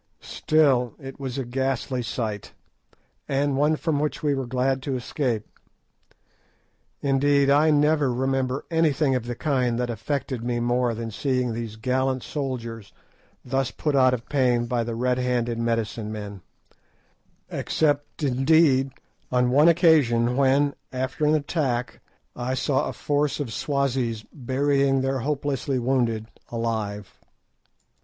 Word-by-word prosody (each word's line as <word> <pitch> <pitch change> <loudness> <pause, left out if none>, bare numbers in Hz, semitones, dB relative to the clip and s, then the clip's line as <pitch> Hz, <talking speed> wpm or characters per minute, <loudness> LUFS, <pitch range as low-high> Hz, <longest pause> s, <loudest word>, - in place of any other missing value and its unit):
Still 135 -7 +2
it 135 0 -9
was 135 -1 -4
a 135 - -2
ghastly 130 0 -1
sight, 110 -3 -4 0.8
and 140 0 +1
one 150 +3 +3
from 155 -2 -1
which 150 +1 -2
we 145 -1 +2
were 135 -2 -3
glad 130 +2 0
to 135 0 -3
escape; 125 -3 -2 1.6
indeed, 140 0 +3
I 150 +3 +5
never 150 -2 +3
remember 130 +1 -1
anything 155 -3 +2
of 125 -2 -2
the 120 - -3
kind 125 -4 0
that 120 -1 -1
affected 125 +2 -3
me 120 0 -1
more 120 0 +1
than 115 0 -5
seeing 125 0 -1
those 115 -1 -5
gallant 130 +3 -1
soldiers 115 -7 -5 0.5
thus 135 0 0
put 145 +3 -2
out 130 -1 +5
of 115 - -10
pain 125 -4 +2
by 120 0 0
the 115 0 -4
red 125 +1 0
handed 120 -2 0
medicine 115 -2 -2
men, 105 -3 -7 1.1
except, 145 -1 -1
indeed, 135 0 +3 0.4
on 125 0 +2
one 145 +5 +5
occasion 145 -9 +4
when, 140 +1 +3 0.2
after 130 +4 -2
an 155 - +4
attack, 140 -5 -1 0.4
I 125 +1 -2
saw 135 +1 0
a - - -5
force 145 0 -1
of 130 -7 -3
Swazis 130 -4 -1
burying 135 0 +1
their 135 0 0
hopelessly 140 0 -1
wounded 120 -3 0 0.2
alive. 110 -4 -3
130 Hz, 135 wpm, -24 LUFS, 120-140 Hz, 1.6 s, I